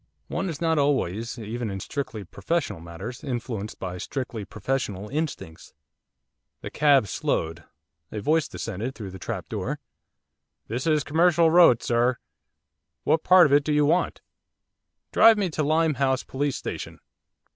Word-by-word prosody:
One 190 - -2
is 155 -3 -5
not 160 -2 +1
always, 115 -5 0
even 115 +1 -4
in 95 -1 -4
strictly 115 -1 -5
professional 125 - -2
matters, 85 +9 -8
influenced 120 -6 -4
by 90 -1 -5
strictly 120 -5 -4
professional 105 -1 -3
instincts. 145 - -5 0.9
The - - -7
cab 145 -5 +4
slowed. 80 -2 -2 0.5
A 105 - -4
voice 155 +8 +1
descended 115 +4 -5
through 100 -4 -7
the 95 - -9
trap - - -5
door. - - -3 0.9
'This 120 +7 -3
is 155 -2 +3
Commercial 165 +1 +3
Road, 165 -9 +6
sir, 120 +1 +2 0.9
what 160 +2 +2
part 185 -1 +7
of 140 - +2
it 145 0 +5
do 150 - -2
you 150 0 +3
want?' 170 +5 +1 0.9
'Drive 225 0 +7
me 195 -4 0
to 155 - -2
Limehouse 145 -4 +1
Police 140 0 -2
Station. - - -6
135 Hz, 145 wpm, -25 LUFS, 105-155 Hz, 0.9 s, part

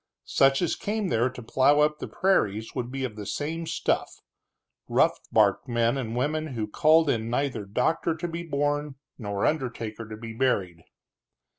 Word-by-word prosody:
Such 135 +4 +3
as 170 - 0
came 210 -1 -2
there 120 +2 +2
to 125 -1 -10
plow 135 +5 +3
up 150 0 +2
the - - -5
prairies 110 - +1
would 120 0 -4
be 135 0 -3
of 120 -5 -3
the 105 -2 -7
same 165 +3 -3
stuff, - - 0 0.8
rough - - +3
barked 105 +2 +3
men 120 0 +1
and 120 -4 -3
women 150 +2 -1
who 110 -2 -1
called 160 +7 +4
in 115 -4 0
neither 125 -4 -1
doctor 125 +10 0
to 170 +2 -4
be 170 0 -5
born 145 -2 -1 0.2
nor 100 -3 -2
undertaker 115 -6 -2
to 110 - -7
be 115 0 -7
buried. 100 -9 0
130 Hz, 170 wpm, -26 LUFS, 110-150 Hz, 0.8 s, called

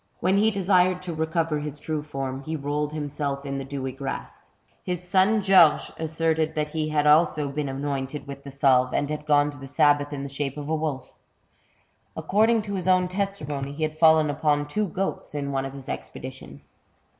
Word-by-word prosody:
When 190 +3 +2
he 215 +2 +4
desired 185 -2 +2
to 175 -2 -4
recover 160 -1 -1
his 150 -1 -5
true 155 0 -3
form, 135 -3 -5
he 155 +3 -4
rolled 145 0 -2
himself 145 -2 -3
in 140 0 -3
the - - -4
dewy 135 -1 -4
grass. 135 +1 -7 0.3
His 180 0 -4
son 195 +4 +3
Georges 185 -6 +5
asserted 160 0 -1
that 150 -1 -1
he 155 -1 -2
had 150 -1 +1
also 150 -1 +4
been 145 0 -2
anointed 135 +1 -3
with 140 -1 -9
the 140 - -8
salve, 130 -2 +3
and 145 - +1
had 150 0 -5
gone 145 -1 +4
to 145 - -12
the 135 - -9
sabbath 145 0 +3
in 140 -2 -4
the - - -4
shape 140 0 -4
of 145 0 -6
a 160 - +1
wolf. 150 -5 -4 1.0
According 220 +2 +2
to 205 -1 -5
his 185 -2 -2
own 185 -1 +3
testimony, 150 -8 -3
he 155 +2 -4
had 155 0 -1
fallen 160 -1 +5
upon 145 0 +1
two 210 +7 -1
goats 190 -3 -4
in 140 -1 -2
one 135 -1 -1
of 135 - -6
his 135 -1 -10
expeditions. 130 +1 -8
150 Hz, 195 wpm, -25 LUFS, 140-165 Hz, 1.0 s, Georges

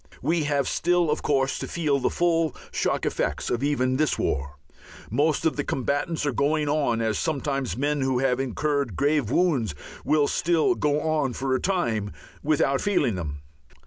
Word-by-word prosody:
We 165 -2 +1
have 145 -2 +1
still, 175 -3 +2
of - - -1
course, 135 -2 +1
to - - -4
feel 150 -5 0
the 125 - +1
full 165 -3 +1 0.2
shock - - -1
effects - - -1
even 140 -3 +1
of 130 - 0
this 155 - +2
war. 70 +1 -2 0.5
Most 155 +2 +1
of 160 - +1
the 145 - 0
combatants 145 +5 -1
are 145 - +1
going 150 +4 +1
on, 145 -6 +1
as 110 -1 0
sometimes 140 -5 -2
men 145 +1 0
who 130 -1 +1
have 130 0 +1
incurred 140 - -1
grave 145 - +1
wounds 135 - +1 0.3
will 150 -2 +3
still 170 +2 +2
go 150 -3 0
on 155 -5 0
for 130 +1 -1
a 130 - +2
time 115 - 0 0.3
without 140 -2 +1
feeling 180 - +1
them. 75 -6 -5
145 Hz, 175 wpm, -25 LUFS, 130-155 Hz, 0.5 s, will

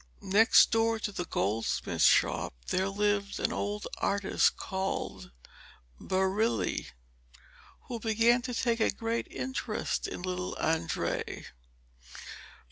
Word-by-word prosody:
Next 210 +4 +5
door 225 0 +2
to 215 -1 -3
the 180 -3 -4
goldsmith's 105 - -1
shop - - +3
there 190 +1 +1
lived 205 0 0
an - - 0
old 205 +1 -3
artist 200 -1 +1
called 190 0 -4 0.7
Barile, 190 +4 0 0.9
who 240 -2 -6
began 230 +2 +3
to 245 -1 -4
take 235 0 0
a 220 - +3
great 230 +1 -2
interest 260 0 -3
in - - -6
little 180 0 -3
Andrea. 160 -1 -1
205 Hz, 110 wpm, -30 LUFS, 190-225 Hz, 0.9 s, Next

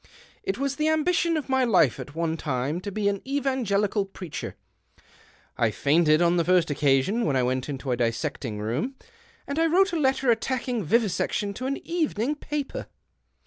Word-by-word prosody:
It 390 - -2
was 275 0 -2
the 305 - +1
ambition 330 +1 +2
of 300 - -4
my 265 -1 +2
life 185 - +3
at 140 - -8
one 165 -1 -1
time 145 +2 -2
to 200 - -5
be 205 +1 -1
an 200 -1 0
evangelical 245 -7 0
preacher. 190 -4 -7 1.0
I 115 - +3
fainted 155 +7 +3
on 175 +1 +3
the 170 - +3
first 175 -2 +3
occasion 145 - +2
when 145 - +1
I 130 - +2
went 130 +2 -1
into 135 -2 -4
a 120 - +1
dissecting 115 -1 -2
room, 120 - -2 0.5
and 280 +3 -3
I 330 - +4
wrote 380 +3 +3
a 335 - 0
letter 265 -3 +2
attacking 245 -1 -1
vivi 225 +7 +3
section 200 +2 -1
to 255 +6 -4
an 275 - -1
evening 300 -7 0
paper. 295 -1 -4
200 Hz, 180 wpm, -26 LUFS, -, 1.0 s, I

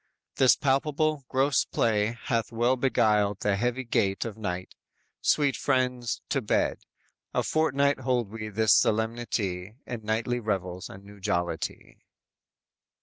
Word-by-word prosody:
This 130 -2 +6
palpable, 150 +1 0
gross 135 -1 +2
play 110 0 0
hath 115 -3 -1
well 120 +3 +2
beguiled 105 -6 +2
The 105 -1 +2
heavy 120 +5 -1
gait 100 -4 0
of 115 -3 -5
night 95 -4 -4 0.5
sweet 140 -4 +2
friends, 125 -3 0
to - - +1
bed; - - 0 0.6
A - - +2
fortnight 140 -3 +2
hold 125 -5 0
we 110 -1 -5
this 110 +1 +3
solemnity 110 -4 0
In 120 -2 -5
nightly 115 +3 -1
revels 95 -5 -3
and 95 - -11
new 100 0 -13
jollity!" 85 -3 -3
115 Hz, 130 wpm, -27 LUFS, 105-130 Hz, 0.6 s, This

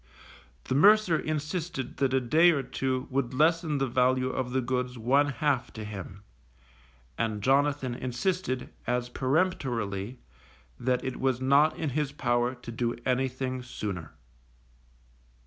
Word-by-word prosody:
The - - -3
mercer 195 +2 +5
insisted 155 -1 -3
that 135 -2 +1
a 130 - +3
day 155 +8 +5
or 145 -5 +1
two 130 0 -2
would 130 -1 -1
lessen 160 +1 +2
the 135 - +1
value 130 +1 +2
of 130 -1 -2
the 130 +1 0
goods 125 0 -2
one 135 +6 +3
half 140 -3 0
to 110 - -7
him, 100 -2 -8 1.0
and 110 -3 -1
Jonathan 140 -1 +2
insisted, 130 +3 -2 0.2
as 125 0 0
peremptorily, 125 - -1 0.6
that 125 0 0
it 130 -1 -4
was 130 -2 +1
not 140 +4 +4
in 155 -4 -2
his 145 +1 -1
power 120 -2 0
to 120 -1 -9
do 120 +1 -1
anything 130 0 -1
sooner. 95 -10 -6
130 Hz, 135 wpm, -28 LUFS, 120-145 Hz, 1.0 s, mercer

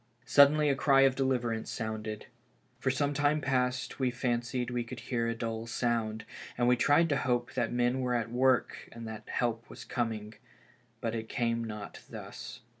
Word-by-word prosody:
Suddenly 150 +1 +6
a 140 - +4
cry 135 0 +4
of 135 -1 +5
deliverance 120 -4 0
sounded. 110 -1 -4 0.5
For. - - 0
some 140 +2 +1
time 145 +1 +2
past 125 -2 -1
we 130 -1 +2
had 120 - -9
fancied 120 0 -1
we 120 -1 -1
could 115 - -8
hear 115 -2 -1
a 115 - -1
dull 115 0 -4
sound, 115 -2 -1 0.3
and 120 0 +2
we 125 - +6
tried 145 +6 +4
to 145 - +2
hope 120 -1 0
that 120 -3 0
men 120 +1 +1
were 125 -1 0
at 115 -1 -1
work 130 +1 +1
and 115 -1 -8
that 110 -1 -8
help 115 -1 -1
was - - -10
coming; 110 -3 -3 0.7
but 115 -1 -1
it 110 -1 -4
came 115 -1 0
not 105 -2 -7
thus. - - -8
120 Hz, 185 wpm, -31 LUFS, 115-130 Hz, 0.7 s, Suddenly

